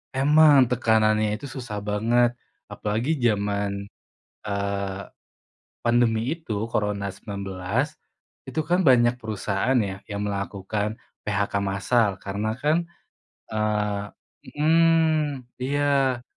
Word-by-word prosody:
Emang. 145 0 +6
Tekanannya 110 -3 +2
itu 130 - -8
susah 120 -6 -6
banget. 115 +4 +2 0.4
Apalagi 115 +9 -1
jaman, 100 -3 0 0.6
eee, 100 -1 -2 0.8
pandemi 120 -2 +2 0.2
itu, 110 -10 -3
Corona 105 -2 -1
19, 100 +8 -3 0.5
itu 130 +4 -2
kan, 175 +3 +1
banyak 125 -2 +5
perusahaan, 110 +2 -1
ya, 95 -2 -3
yang 100 -1 -5
melakukan 100 +1 -3 0.3
PHK 100 +1 -1
massal. 100 +3 +2
Karena 105 +3 -2
kan, 155 +5 +1 0.6
eee 105 -1 -1 0.4
mhm, 160 -2 +2 0.2
iya. 135 -1 +1
110 Hz, 95 wpm, -25 LUFS, 100-130 Hz, 0.8 s, Emang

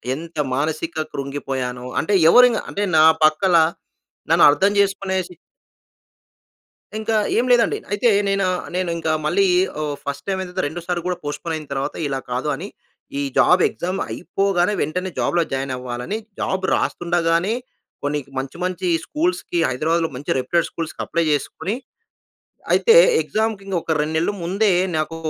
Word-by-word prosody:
ఎంత 165 +2 -9 0.2
మానసిక 155 +3 -2 0.2
కృంగిపోయానో, 135 -3 -4 0.2
అంటే, 185 - -1 0.2
ఎవరైనా 245 -2 +6
అంటే 205 - -2
నా 155 - +7 0.2
పక్క‌ల 170 +4 +4 0.8
నన్ను - - +5
అర్థం 195 +7 +2
చేసుకునే 195 -1 +1
సి 180 - -14 1.6
ఇంకా 220 +1 -1 0.2
ఏమి 245 +2 +2
లేదండి. 240 -1 +3
అయితే 215 +4 +2 0.2
నేనా 195 -1 +1 0.3
నేను 180 -1 -1
ఇంకా 160 -1 -1
మళ్ళీ 195 +6 +3 0.4
ఓహ్, 145 -1 -2
ఫస్ట్ 140 0 -5
టైమ్ 190 -1 -1
అయిన 185 - -6
తర్వాత 180 - -2
రెండోసారి 175 +3 -3
కూడా 180 -1 -1
పోస్ట్‌పోన్ 160 +3 -4
అయిన 155 - -6
తర్వాత 135 0 -3
ఇలా 135 -1 -2
కాదు, 125 +4 -2
అని 185 +8 -7 0.5
ఈ - - -1 0.2
జాబ్ 180 0 +5
ఎగ్జామ్ 185 +2 -4
అయిపోగానే, 195 +1 0
వెంటనే 180 +5 -2
జాబ్‌లో 170 -1 +2
జాయిన్ 135 0 -2
అవ్వాలని 125 - -4 0.2
జాబ్ 190 0 -1
రాస్తుండగానే, 170 +3 0 0.5
కొన్ని 145 +1 0 0.2
మంచి, 135 +5 -4
మంచి 185 0 -3 0.2
స్కూల్స్‌కి 330 - -1
హైదరాబాద్‌లో 160 +5 0
మంచి 140 +3 -4
రెప్యూటెడ్ 165 +7 0
స్కూల్స్‌కి 165 -1 -5
అప్లై 170 0 0
చేసుకొని, 160 +7 -2 1.0
అయితే 460 -1 +5 0.3
ఎగ్జామ్‌కి 220 -2 -2
ఇంక 195 - -2
ఒక 160 - -1
2 155 +1 -2
నెలలు 170 +5 0
ముందే 195 +3 +2 0.2
నాకు 155 +1 -2
170 Hz, 145 wpm, -21 LUFS, 150-195 Hz, 1.6 s, నా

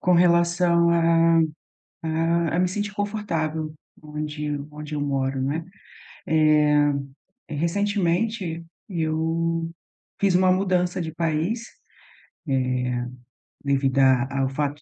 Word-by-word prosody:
com 180 - +2
relação 170 0 +4
a 165 0 +4 0.6
a 165 +1 0
a - - 0
me 180 0 +3
sentir 205 +2 -3
confortável, 165 -7 -2 0.3
onde 150 0 -4 0.2
onde 150 0 -7
eu 150 - -2
moro, 135 -2 -1
né? 145 +5 -1 0.6
Eh, 150 -2 +4 0.6
recentemente, 175 +2 -1 0.2
eu 165 -1 -1 0.5
fiz 195 -2 +3
uma 185 +1 +4
mudança 185 -1 +1
de 160 -2 -4
país, 165 +7 -1
eh, - - -10 2.0
devido 135 -1 +1
a 135 0 +3
ao 135 - +1
fato 145 +2 -3
165 Hz, 105 wpm, -24 LUFS, 150-175 Hz, 2.0 s, relação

